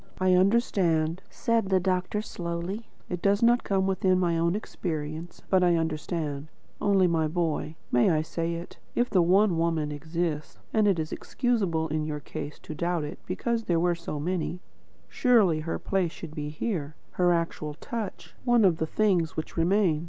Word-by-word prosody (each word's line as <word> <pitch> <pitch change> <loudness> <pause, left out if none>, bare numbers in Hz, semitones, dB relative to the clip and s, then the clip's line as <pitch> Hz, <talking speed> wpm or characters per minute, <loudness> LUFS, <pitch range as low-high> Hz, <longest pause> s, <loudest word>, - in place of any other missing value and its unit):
"I 185 0 +4
understand," 180 -5 +2
said 230 -5 0
the 190 -1 +4
doctor 185 +3 0
slowly. 175 +4 -4 0.2
"It 180 -1 -4
does 200 +2 +2
not 240 +1 +4
come 190 -1 +1
within 190 -1 +2
my 175 -2 +2
own 170 +2 +1
experience, 160 -5 -5
but 190 -1 +3
I 175 -1 +4
understand. 155 -2 -2 0.3
Only 195 -2 +4
my 165 -2 +2
dear - - -1
boy, 160 -2 -1 0.2
may 120 +6 +4
I 155 -3 +2
say 165 +1 -2
it? 170 +1 -8 0.2
if 240 +1 +1
the 185 - +5
One 185 0 +4
Woman 165 -3 0
exists 160 +1 -3 0.2
and 215 -1 +4
it 195 -3 +3
is 155 -1 -3
excusable 195 -10 0
in 155 +1 -1
your 150 -1 -3
case 145 0 -7
to - - -6
doubt 170 +1 -1
it, 150 +5 -6
because 235 -2 -1
there 170 -2 +2
were 175 +1 +2
so 165 -3 -5
many 180 +2 -2 0.5
surely 215 - +3
her 160 +2 -3
place 190 -4 0
should 165 -2 -9
be 150 -2 -4
here; 155 -2 -3 0.2
her 180 -1 +2
actual 165 -3 -1
touch, 225 +6 -6
one 240 -4 +4
of 175 -4 +4
the 160 - -1
things 180 -4 +1
which 155 - -4
remain." 175 -1 +3
170 Hz, 180 wpm, -27 LUFS, 160-195 Hz, 0.5 s, the